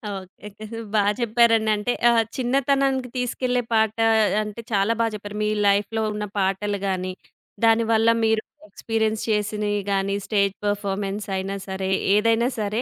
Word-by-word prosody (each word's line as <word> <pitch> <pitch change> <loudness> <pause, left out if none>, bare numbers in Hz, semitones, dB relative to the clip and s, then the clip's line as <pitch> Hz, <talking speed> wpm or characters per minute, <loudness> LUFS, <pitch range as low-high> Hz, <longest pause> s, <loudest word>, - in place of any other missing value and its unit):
Okay, 190 +2 -10
okay. 215 +1 -7 0.2
బాగా 205 -1 +3
చెప్పారండి 230 -1 +3
అంటే, 210 +4 -1 0.2
ఆహ్, 230 -1 +4
చిన్నతనానికి 270 0 +1
తీసుకెళ్ళే 250 0 -1
పాట 220 -1 +2 0.5
అంటే 210 +2 -7
చాలా 200 +3 +2
బా - - +3
చెప్పారు 205 0 -7
మీ 210 - +1 0.2
లైఫ్‌లో 205 +3 +1
ఉన్న 210 0 -3
పాటలు 195 +1 -1
గాని 185 -1 -2 0.5
దానివల్ల 225 0 +3 0.2
మీరు 220 0 +2 0.3
ఎక్స్‌పీరియన్స్ 220 -1 -1
చేసినయి 210 -1 0
గాని, 195 0 0
స్టేజ్ 200 -2 +1
పెర్ఫార్మన్స్ 200 0 -2
అయినా 195 +1 -3
సరే, 190 0 -3 0.3
ఏదైనా 230 +3 +3
సరే. 210 +2 -1
210 Hz, 135 wpm, -23 LUFS, 200-230 Hz, 0.5 s, ఆహ్